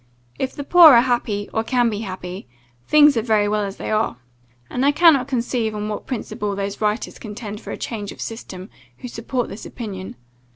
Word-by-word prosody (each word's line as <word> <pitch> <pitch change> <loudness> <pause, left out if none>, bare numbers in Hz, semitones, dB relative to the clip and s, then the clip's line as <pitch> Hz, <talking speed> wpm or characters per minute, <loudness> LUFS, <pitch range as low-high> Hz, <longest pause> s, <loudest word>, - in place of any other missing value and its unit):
If 260 - -2
the 285 - -5
poor 320 -2 +8
are 235 - +7
happy, 235 -5 -1
or 220 - 0
can 245 +1 +2
be 205 - -3
happy, 185 - -7 0.4
things 295 -2 +6
are - - +2
very 215 -2 +2
well 210 0 0
as 195 -1 -5
they - - -5
are. 215 - 0 0.5
And 250 - -2
I 285 - +5
cannot 295 -4 +5
conceive 235 -4 -1
on 210 0 -3
what 210 - -5
principle 210 -4 -3
those 200 +1 -4
writers 210 +2 -1
contend 210 -1 -7
for - - -10
a - - -4
change 210 -4 -5
of - - -13
system, 195 -4 -7 0.3
who - - -8
support 240 +1 -3
this 205 - -9
opinion. 195 -6 -7
220 Hz, 200 wpm, -21 LUFS, 205-250 Hz, 0.5 s, poor